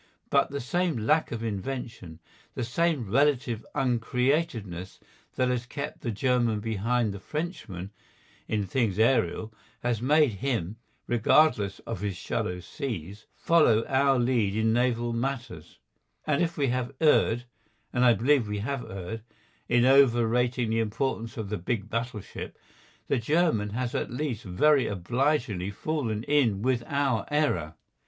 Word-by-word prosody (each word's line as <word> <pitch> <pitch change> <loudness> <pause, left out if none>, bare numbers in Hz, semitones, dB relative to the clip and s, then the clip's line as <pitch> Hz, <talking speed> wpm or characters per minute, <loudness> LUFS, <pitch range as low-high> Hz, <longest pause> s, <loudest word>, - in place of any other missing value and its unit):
But - - +3
the 140 - -4
same 170 +3 0
lack 150 +9 +1
of 115 -1 -4
invention, 110 -5 -5 0.4
the 125 - -2
same 140 0 0
relative 130 -4 +2
uncreativeness 120 - -1 0.4
that 130 - +1
has 125 -1 -1
kept 145 +5 -6
the 120 - -3
German 120 0 +1
behind 110 +1 0
the 100 - -7
Frenchman 110 - -5 0.6
in 105 -2 -1
things 105 -1 0
aerial 110 -2 +2 0.3
has 120 -2 0
made 150 +1 +4
him, 115 -7 -1 0.3
regardless 120 -4 +3
of - - -5
his 100 -3 -3
shallow 90 +1 -3
seas, 105 - -6
follow 120 -10 +3
our 135 0 +3
lead 120 -5 +1
in 110 0 +2
naval 120 -1 +1
matters, 120 - -4 0.5
and 150 -2 +1
if 170 -1 -1
we 140 -3 +1
have 130 +2 -2
erred, 120 -6 +3 0.5
and 125 - +2
I 120 -2 +6
believe 130 -1 +2
we 105 0 -3
have 130 +5 -3
erred, 95 +4 -6 0.5
in 120 0 +4
overrating 125 -2 +3
the 115 - +1
importance 115 0 -2
of 110 -3 -4
the 105 - -3
big 105 +3 -3
battleship, 115 -2 -5 0.5
the - - +1
German 145 -5 +1
has 120 +3 -3
at - - -2
least 125 -3 -3
very 135 +10 +3
obligingly 115 - 0
fallen 115 -1 -2
in 125 -8 +2
with 125 -1 +1
our 140 -5 0
error. 145 - 0
120 Hz, 140 wpm, -27 LUFS, 105-135 Hz, 0.6 s, I